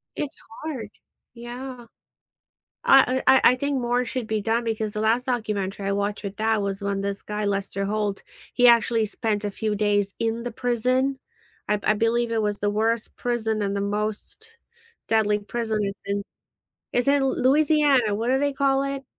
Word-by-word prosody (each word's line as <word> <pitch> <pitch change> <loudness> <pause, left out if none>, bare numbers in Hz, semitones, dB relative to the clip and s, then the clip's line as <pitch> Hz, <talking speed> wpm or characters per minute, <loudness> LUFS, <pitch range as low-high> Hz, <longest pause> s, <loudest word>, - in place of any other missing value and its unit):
It's 290 - -4 0.3
hard, 245 -10 -5 0.4
yeah. 245 +1 -8 1.0
I 260 -1 +5
I 265 - +8
I - - +2
I - - -1
think 280 0 -1
more 245 +1 +1
should 245 -3 -4
be 220 -1 -1
done 230 +2 0
because 220 -2 -2
the 210 - -3
last 230 +3 +2
documentary 205 -5 -2
I - - +1
watched 205 +1 -2
with 200 0 -5
dad 220 0 +1
was 200 0 -2
when 200 0 -1
this 200 0 -3
guy 210 0 -3
Lester 195 0 -2
Holt, 205 -1 -2 0.3
he 245 -1 +5
actually 230 -1 +4
spent 215 -1 -2
a 205 - -2
few 215 0 -2
days 205 -1 +1
in 230 +1 -1
the 245 - -4
prison? 255 +2 0 0.5
I've 210 -1 0
I 210 - +3
believe 230 +2 +1
it 225 -1 +1
was 205 -1 -1
the 205 - 0
worst 225 +2 0
prison 225 -3 -1
and 200 0 -1
the 200 - -1
most 215 - -4 0.5
deadly 210 -2 +2
prison 220 +1 -3
is 195 0 -2
in 200 0 -2 0.7
it's 245 +3 +1
in 280 -1 +4
Louisiana; 275 -3 +3
what 225 +3 -2
do 265 - +3
they 285 0 +1
call 270 0 +2
it? 275 -1 -4
225 Hz, 180 wpm, -24 LUFS, 205-250 Hz, 1.0 s, I